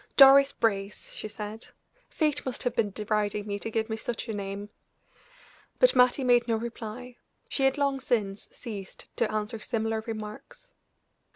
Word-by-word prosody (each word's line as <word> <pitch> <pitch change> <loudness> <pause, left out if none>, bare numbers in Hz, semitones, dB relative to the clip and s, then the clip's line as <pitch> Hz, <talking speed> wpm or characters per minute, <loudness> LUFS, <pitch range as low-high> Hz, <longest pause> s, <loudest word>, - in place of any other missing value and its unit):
"Doris 275 0 +9
Brace!" 200 -2 -2
she - - -4
said. 215 +1 -7 0.4
"Fate 300 -3 +1
must 260 -2 -3
have 245 -1 -1
been 225 -3 +2
deriding 210 0 -1
me 205 -1 -3
to 225 - -4
give 220 0 -1
me 220 - -2
such 235 +1 -4
a 225 - -3
name." 200 0 -5 1.1
But - - +5
Mattie 250 +2 +5
made 245 -1 +4
no 230 - +2
reply; 235 +2 -6 0.3
she 270 - 0
had 270 +2 +3
long 280 -1 +1
since 210 -6 -1
ceased 205 -6 -8
to 235 - +1
answer 215 +1 -2
similar 220 -1 -2
remarks. 215 - -8
225 Hz, 160 wpm, -28 LUFS, 210-250 Hz, 1.1 s, Doris